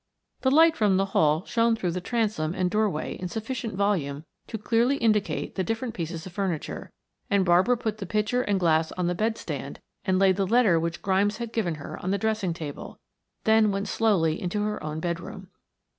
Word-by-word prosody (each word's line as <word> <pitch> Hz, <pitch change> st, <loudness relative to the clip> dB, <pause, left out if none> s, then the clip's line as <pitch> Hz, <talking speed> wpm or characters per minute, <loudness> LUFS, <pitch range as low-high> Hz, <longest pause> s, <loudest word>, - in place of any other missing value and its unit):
The 260 Hz, -, +3 dB
light 320 Hz, +4 st, +6 dB
from 205 Hz, -3 st, +3 dB
the 195 Hz, -, +2 dB
hall 155 Hz, +4 st, +3 dB
shone 230 Hz, 0 st, +2 dB
through 180 Hz, -5 st, -2 dB
the 180 Hz, +2 st, -3 dB
transom 205 Hz, -7 st, -1 dB
and 180 Hz, -1 st, 0 dB
doorway 210 Hz, -7 st, 0 dB
in 180 Hz, -, -4 dB
sufficient 225 Hz, +2 st, -4 dB
volume 165 Hz, -8 st, -1 dB, 0.2 s
to 220 Hz, -, -4 dB
clearly 235 Hz, +5 st, +2 dB
indicate 215 Hz, -5 st, 0 dB
the 190 Hz, -, -1 dB
different 225 Hz, +5 st, -3 dB
pieces 165 Hz, -2 st, -5 dB
of 185 Hz, -, -8 dB
furniture, 185 Hz, -5 st, -3 dB, 0.4 s
and 200 Hz, -2 st, +3 dB
Barbara 185 Hz, +8 st, +4 dB
put 220 Hz, -2 st, -3 dB
the 195 Hz, -, -5 dB
pitcher 215 Hz, +5 st, +1 dB
and 205 Hz, -5 st, 0 dB
glass 160 Hz, -2 st, +2 dB
on 180 Hz, -, -2 dB
the 175 Hz, -, +1 dB
bed 220 Hz, +5 st, -1 dB
stand -, -, -6 dB, 0.2 s
and 190 Hz, -3 st, +1 dB
laid 190 Hz, -1 st, +4 dB
the 195 Hz, -1 st, +1 dB
letter 220 Hz, -6 st, +4 dB
which 170 Hz, +1 st, -3 dB
Grimes 200 Hz, +2 st, +1 dB
had 235 Hz, -1 st, -6 dB
given 180 Hz, -8 st, 0 dB
her 145 Hz, -, -8 dB
on 185 Hz, -, -2 dB
the 200 Hz, -, +1 dB
dressing 215 Hz, -4 st, -1 dB
table, 150 Hz, -4 st, -7 dB, 0.5 s
then 220 Hz, -1 st, +4 dB
went 200 Hz, +1 st, -2 dB
slowly 185 Hz, -8 st, +1 dB
into 200 Hz, +3 st, -1 dB
her 210 Hz, 0 st, -3 dB
own 155 Hz, +1 st, -4 dB
bedroom. 185 Hz, +3 st, -5 dB
195 Hz, 200 wpm, -26 LUFS, 175-220 Hz, 0.5 s, light